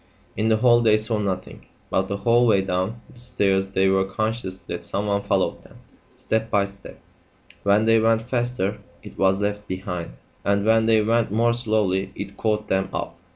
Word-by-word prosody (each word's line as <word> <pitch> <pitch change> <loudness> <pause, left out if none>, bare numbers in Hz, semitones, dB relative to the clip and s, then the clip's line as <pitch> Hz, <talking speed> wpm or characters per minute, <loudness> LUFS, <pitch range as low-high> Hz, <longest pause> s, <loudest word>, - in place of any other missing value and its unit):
In 110 +1 0
the 110 - +4
hall 120 +1 +5
they 110 -2 +4
saw 110 0 -1
nothing, 95 -3 -4 0.2
but 95 0 +1
the 100 - -3
whole 120 +3 +3
way 100 -4 +3
down 95 +5 -2
the 120 - -16
stairs 100 -5 0
they 95 0 +1
were 95 0 +3
conscious 105 0 -3
that 85 - -6
someone 100 0 -1
followed 100 -2 0
them; - - -17 0.4
step 110 0 -2
by 100 -3 +2
step; 100 0 -11 0.6
when 100 +2 +3
they 115 0 +5
went 115 0 +2
faster 120 -5 -2 0.2
IT - - -11
was 95 +1 +2
left 105 0 -2
behind, 90 -8 -5 0.3
and 100 0 +1
when 110 0 +3
they 110 -1 +4
went 115 -1 +1
more 115 +2 +2
slowly 105 -5 0
IT 100 0 -7
caught 105 -1 -1
them 95 0 0
up. 85 - -4
105 Hz, 185 wpm, -23 LUFS, 95-115 Hz, 0.6 s, hall